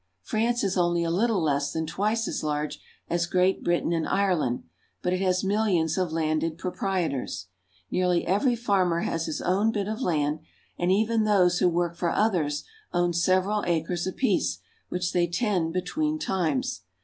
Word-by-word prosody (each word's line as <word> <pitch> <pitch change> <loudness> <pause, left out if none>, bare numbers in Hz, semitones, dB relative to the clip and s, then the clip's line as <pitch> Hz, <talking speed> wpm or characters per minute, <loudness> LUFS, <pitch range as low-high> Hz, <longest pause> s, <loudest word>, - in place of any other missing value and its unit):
France 235 - 0
is 190 -2 0
only 175 -1 +2
a 165 - 0
little 200 0 +1
less 140 -2 +1
than 160 0 -2
twice 215 +7 0
as - - -2
large 150 0 -2 0.3
as 170 0 0
Great 185 +2 +2
Britain 175 0 +1
and 165 -1 0
Ireland, 180 -11 +1 0.4
but 180 - +1
it 185 - -1
has 185 0 +1
millions 190 -6 +1
of 180 -3 -1
landed 160 0 0
proprietors. 175 - -2 0.4
Nearly 180 -1 +1
every 225 +8 +2
farmer 190 -7 +1
has 165 -1 -2
his - - -3
own 200 +5 +2
bit 205 -3 -2
of 220 +4 -3
land, 150 - 0 0.4
and 175 +1 0
even 220 +3 +2
those 185 -4 +3
who 180 - +4
work 170 0 0
for 170 0 0
others 165 -9 +1 0.3
own 175 0 +1
several 185 +4 +2
acres 170 +1 0
apiece, 255 +8 0 0.3
which 180 0 -2
they 175 -1 +2
tend 175 -2 0
between 305 - -1
times. 255 - -1
180 Hz, 165 wpm, -26 LUFS, 165-200 Hz, 0.4 s, who